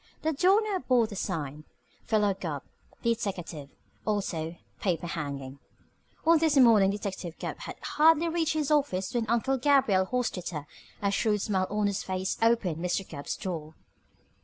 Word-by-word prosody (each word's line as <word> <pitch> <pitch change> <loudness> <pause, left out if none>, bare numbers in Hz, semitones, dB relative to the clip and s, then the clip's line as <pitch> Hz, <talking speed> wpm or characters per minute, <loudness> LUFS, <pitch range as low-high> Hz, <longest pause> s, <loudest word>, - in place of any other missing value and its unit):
The 315 +1 +1
door 370 +8 +4
now 410 -3 -1
bore 250 -7 +3
the 215 -2 -7
sign 155 -6 -3 0.4
PHILO 210 -3 +3
GUBB 160 -7 -5 0.4
DETECKATIVE 190 - -2 0.3
Also 175 -6 -2 0.2
Paper 175 -3 -1
hanging 140 -5 -5 0.7
On 330 0 +6
this 310 -3 +2
morning 225 -7 +7
Detective 195 -4 -4
Gubb - - -5
had - - -7
hardly 320 +2 +4
reached 330 -1 0
his 305 -2 -1
office 255 -10 +1
when 235 -2 0
Uncle 240 +4 +1
Gabriel 240 -9 +3
Hostetter, 180 - -2 0.4
a 200 - +2
shrewd 210 0 +1
smile 190 -3 0
on 210 0 0
his 200 -1 0
face, 185 0 -2
opened 225 -8 +2
Mr. 180 +2 -1
Gubb's 140 - -5
door. 160 -4 -5
200 Hz, 150 wpm, -28 LUFS, 175-250 Hz, 0.7 s, morning